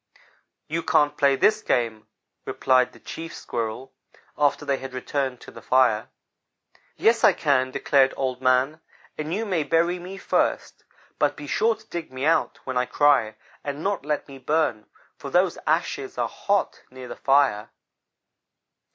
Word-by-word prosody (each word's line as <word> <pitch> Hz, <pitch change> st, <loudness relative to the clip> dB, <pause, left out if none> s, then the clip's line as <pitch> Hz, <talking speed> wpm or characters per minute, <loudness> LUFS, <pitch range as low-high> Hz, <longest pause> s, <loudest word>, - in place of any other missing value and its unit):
"'You 165 Hz, +2 st, -2 dB
can't 150 Hz, -2 st, +2 dB
play 140 Hz, -2 st, +3 dB
this 215 Hz, +9 st, +3 dB
game,' 115 Hz, -, -1 dB, 0.4 s
replied 130 Hz, -1 st, +2 dB
the -, -, -17 dB
Chief 165 Hz, 0 st, -8 dB
Squirrel, 115 Hz, +3 st, -5 dB, 0.4 s
after 145 Hz, -1 st, +1 dB
they 140 Hz, -, +1 dB
had 130 Hz, -1 st, -8 dB
returned 130 Hz, -1 st, -2 dB
to -, -, -12 dB
the -, -, -12 dB
fire. 125 Hz, -4 st, +2 dB, 0.9 s
"'Yes, 230 Hz, 0 st, +3 dB
I -, -, +7 dB
can,' 130 Hz, -4 st, +1 dB
declared 135 Hz, 0 st, +3 dB
Old 130 Hz, -1 st, -2 dB
man, 130 Hz, +5 st, +2 dB, 0.3 s
'and 155 Hz, +1 st, -5 dB
you 215 Hz, +6 st, -1 dB
may 185 Hz, -6 st, 0 dB
bury 170 Hz, +4 st, +1 dB
me 185 Hz, +2 st, -8 dB
first, -, -, -1 dB, 0.4 s
but -, -, +1 dB
be 145 Hz, -, -8 dB
sure 225 Hz, +10 st, +1 dB
to 220 Hz, 0 st, -21 dB
dig 170 Hz, -4 st, -6 dB
me 130 Hz, +2 st, -4 dB
out 165 Hz, -, +2 dB
when 130 Hz, -1 st, -3 dB
I 125 Hz, 0 st, +1 dB
cry, 140 Hz, -7 st, +3 dB, 0.3 s
and 145 Hz, +2 st, -5 dB
not 200 Hz, -6 st, -1 dB
let 150 Hz, 0 st, -2 dB
me 135 Hz, -1 st, -11 dB
burn, 130 Hz, -6 st, 0 dB, 0.3 s
for -, -, -7 dB
those -, -, +2 dB
ashes -, -, -1 dB
are -, -, 0 dB
hot -, -, -1 dB
near 130 Hz, 0 st, -10 dB
the -, -, -7 dB
fire.' 135 Hz, -7 st, +2 dB
140 Hz, 160 wpm, -24 LUFS, 130-160 Hz, 0.9 s, I